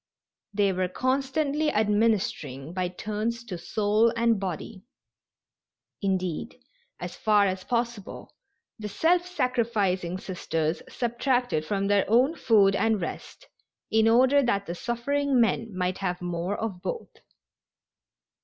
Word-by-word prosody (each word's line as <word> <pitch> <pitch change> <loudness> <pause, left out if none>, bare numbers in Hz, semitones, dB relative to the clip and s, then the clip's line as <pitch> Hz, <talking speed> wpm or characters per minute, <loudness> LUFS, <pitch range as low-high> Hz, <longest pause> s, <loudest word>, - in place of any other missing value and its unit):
They 200 -1 +2
were 185 0 0
constantly 275 - 0
administering 205 - 0
by 185 -1 -1
turns 215 +5 -3
to 190 -7 -6
soul 215 +5 +2
and 230 -2 +2
body. 190 +1 -5 1.2
Indeed, 190 +3 -2 0.4
as 175 0 -6
far 210 -2 +3
as 185 -1 -2
possible, 235 -4 -3 0.5
the 210 -1 -5
self 350 - +2
sacrificing 220 - 0
Sisters 165 -4 -2
subtracted 245 - 0
from 195 +2 -1
their 200 0 +3
own 250 +8 +4
food 205 -10 +4
and 220 +1 +2
rest 170 - -7 0.5
in 220 0 +4
order 260 +5 +5
that 200 -6 0
the 170 - -4
suffering 255 +6 0
men 225 0 +1
might 180 0 -1
have 180 -2 -2
more 175 +2 -3
of 200 -5 -4
both. 465 - -5
210 Hz, 120 wpm, -27 LUFS, 185-240 Hz, 1.2 s, order